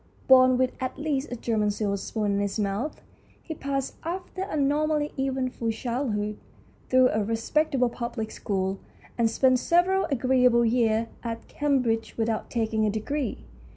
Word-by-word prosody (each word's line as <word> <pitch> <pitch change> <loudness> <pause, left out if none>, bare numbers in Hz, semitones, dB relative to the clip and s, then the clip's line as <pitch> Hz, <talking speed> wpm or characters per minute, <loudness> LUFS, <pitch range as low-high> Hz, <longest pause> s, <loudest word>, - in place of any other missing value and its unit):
Born 255 -1 +7
with 255 0 +2
at 255 0 -3
least 295 -2 -2
a - - -2
German 220 -3 0
silver 205 -1 -1
spoon 205 +1 -2
in 200 - +1
his 200 0 -1
mouth, 210 +7 -2 0.4
he 320 - -5
passed, 275 -3 -3
after 365 +3 -5
a 385 -5 -3
normally 295 +1 +1
eventful 260 -3 -1
childhood, 225 -3 -2 0.5
through 255 0 +5
a 215 0 0
respectable 250 +5 +1
public 235 -2 -4
school, 190 -1 -2 0.4
and 230 -1 +2
spent 255 +1 +3
several 360 +6 +3
agreeable 250 -2 +3
years 225 -1 +2 0.2
at 230 -1 -5
Cam 285 -3 +1
bridge 225 -1 -2
without 225 -1 -1
taking 220 -2 0
a 215 - +3
degree. 255 +7 -3
245 Hz, 155 wpm, -26 LUFS, 220-275 Hz, 0.5 s, Born